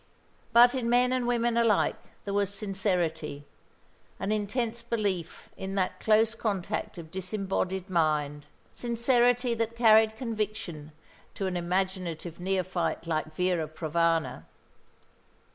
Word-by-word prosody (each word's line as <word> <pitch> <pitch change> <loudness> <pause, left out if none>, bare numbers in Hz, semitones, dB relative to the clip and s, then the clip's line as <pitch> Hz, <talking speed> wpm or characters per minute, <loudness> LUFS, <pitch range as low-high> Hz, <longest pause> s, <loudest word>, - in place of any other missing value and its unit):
But 240 +1 +7
in 250 -3 -1
men 250 +1 +4
and 250 -2 0
women 235 -1 +1
alike 230 -3 +3 0.3
there 200 - -3
was 200 -1 +1
sincerity, 180 -8 -2 0.7
an 200 - -2
intense 225 +3 -1
belief 205 -8 -3
in 190 0 -5
that 185 -2 -1
close 220 +1 +3
contact 210 -3 -3
of 160 -2 -9
disembodied 190 0 -2
mind, 150 -5 0 0.3
sincerity 240 +1 +2
that 230 0 -2
carried 220 -1 +5
conviction 215 - -4 0.4
to 195 - -3
an 185 -1 -2
imaginative 175 -2 -2
neophyte 185 -2 -1
like 155 -1 -2
Vera 180 -3 0
Provana. 160 - 0
195 Hz, 115 wpm, -28 LUFS, 170-230 Hz, 0.7 s, But